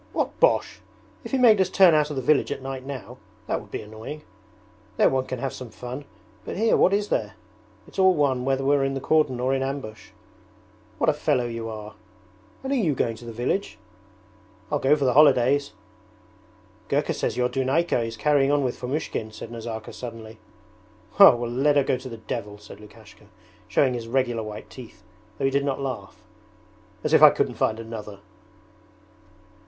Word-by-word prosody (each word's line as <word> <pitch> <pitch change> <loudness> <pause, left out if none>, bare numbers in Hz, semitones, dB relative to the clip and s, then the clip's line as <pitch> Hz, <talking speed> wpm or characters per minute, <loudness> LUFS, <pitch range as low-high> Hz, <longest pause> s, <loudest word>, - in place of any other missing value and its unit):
'What - - -2
bosh! - - +2 0.4
If - - -8
he 270 - +1
made 225 -6 +6
us 185 - +1
turn 185 -3 +6
out 150 -1 +2
of 150 - -5
the 130 - -3
village 150 +3 +2
at - - -5
night 135 -1 -5
now, 135 -3 -8 0.3
that - - -2
would - - -16
be - - -5
annoying: 110 +8 -9 0.7
there - - +4
one 130 -1 -1
can 130 - -4
have 135 +2 -4
some 130 -3 -8
fun, 125 +5 -8 0.4
but - - -6
here 225 +2 +3
what - - +4
is 205 +1 0
there? 105 -1 -1 0.5
It's - - -9
all 190 -1 +5
one 135 -4 +1
whether 135 0 0
we're 140 0 +3
in 135 0 -1
the - - -2
cordon 145 -3 +1
or 130 +2 0
in 135 - 0
ambush. 135 -5 -5 0.9
What - - +3
a - - -4
fellow 125 - 0
you 115 -1 -5
are!' 105 -1 -8 0.7
'And 270 - -3
are - - +2
you 175 - +1
going 115 -2 -1
to 120 - -12
the 115 - -7
village?' 120 - -2 0.9
'I'll - - +1
go 140 +3 +4
for 145 -2 -1
the 125 - +2
holidays.' 140 0 +4 1.2
'Gurka - - 0
says - - -2
your 125 0 +2
Dunayka 135 +3 0
is 115 0 -5
carrying 140 +2 +2
on 145 -1 +2
with 125 -2 -3
Fomushkin,' 125 -4 -3
said 110 +1 -9
Nazarka 115 -1 -7
suddenly. 115 -2 -9 0.8
'Well, 120 -12 +7
let 135 +5 +1
her 140 - +4
go 130 - 0
to 130 +1 -9
the 115 - -8
devil,' 110 -2 -6
said 105 -1 -13
Lukashka, 105 -1 -16 0.4
showing 130 -3 +2
his 115 -2 -5
regular 120 -2 0
white 105 -1 -8
teeth, 120 -6 -12 0.3
though 135 - -1
he 135 - +2
did 140 +1 +1
not 140 -1 -2
laugh. 125 -8 -6 0.8
'As - - -1
if - - +6
I - - +11
couldn't - - -1
find 110 0 -1
another!' 110 -3 -8
130 Hz, 190 wpm, -24 LUFS, 115-145 Hz, 1.2 s, I